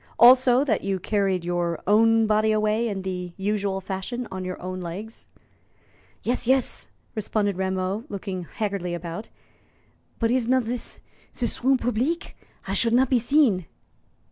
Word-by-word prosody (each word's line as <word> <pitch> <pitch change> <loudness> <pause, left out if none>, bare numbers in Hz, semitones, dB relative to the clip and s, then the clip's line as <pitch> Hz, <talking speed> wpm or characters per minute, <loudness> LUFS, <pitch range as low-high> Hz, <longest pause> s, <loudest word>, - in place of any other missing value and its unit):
Also, 255 +1 +7
that 280 - 0
you 195 -1 -1
carried 195 -2 0
your 175 -1 -1
own 225 +2 +4
body 215 0 +2
away 215 +2 +1
in 195 -2 -4
the 180 -2 -4
usual 200 -1 -1
fashion, 195 +6 -4
on 190 0 -4
your 185 0 -5
own 185 0 -5
legs." 195 +6 -7 1.0
"Yes, 245 0 -1
yes," 260 0 +1 0.3
responded 205 -2 -1
Rameau, 190 +3 -2
looking 190 -4 -5
haggardly 195 -3 -3
about; 170 +4 -6 0.9
"but 230 -1 +1
is 250 -2 +1
not 255 0 +3
zis 240 +1 -4 0.4
zis 240 0 -3
room 265 +1 +4
publique? 250 - -1 0.3
I 195 - -2
should 230 +3 +3
not 255 +2 +3
be 250 - +5
seen." 235 - +3
210 Hz, 145 wpm, -25 LUFS, 190-240 Hz, 1.0 s, Also